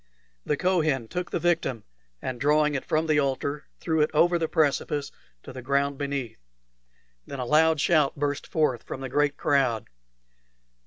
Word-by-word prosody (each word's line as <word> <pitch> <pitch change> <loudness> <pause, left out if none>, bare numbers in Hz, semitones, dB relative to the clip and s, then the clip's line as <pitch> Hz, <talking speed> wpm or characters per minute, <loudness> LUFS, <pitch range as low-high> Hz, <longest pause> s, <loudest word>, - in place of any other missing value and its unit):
The 150 - +1
Kohen 155 -10 +1
took 180 +7 -4
the - - -1
victim, 165 -10 0 0.4
and 125 -2 -4
drawing 150 +1 +3
it 135 - -2
from 155 +1 0
the 155 -2 +2
altar, 140 +1 -2
threw 160 -2 0
it 150 - +3
over 175 +2 +4
the 165 - 0
precipice 145 -2 0 0.3
to - - -10
the 130 - -7
ground 140 +2 0
beneath. 140 - -4 0.9
Then 140 - -6
a 125 - -3
loud 160 +4 +4
shout 150 -3 +3
burst 145 0 -2
forth 145 -7 0
from 135 - -7
the 135 - -5
great 145 +2 +1
crowd. 130 -6 +1
145 Hz, 165 wpm, -26 LUFS, 135-155 Hz, 0.9 s, over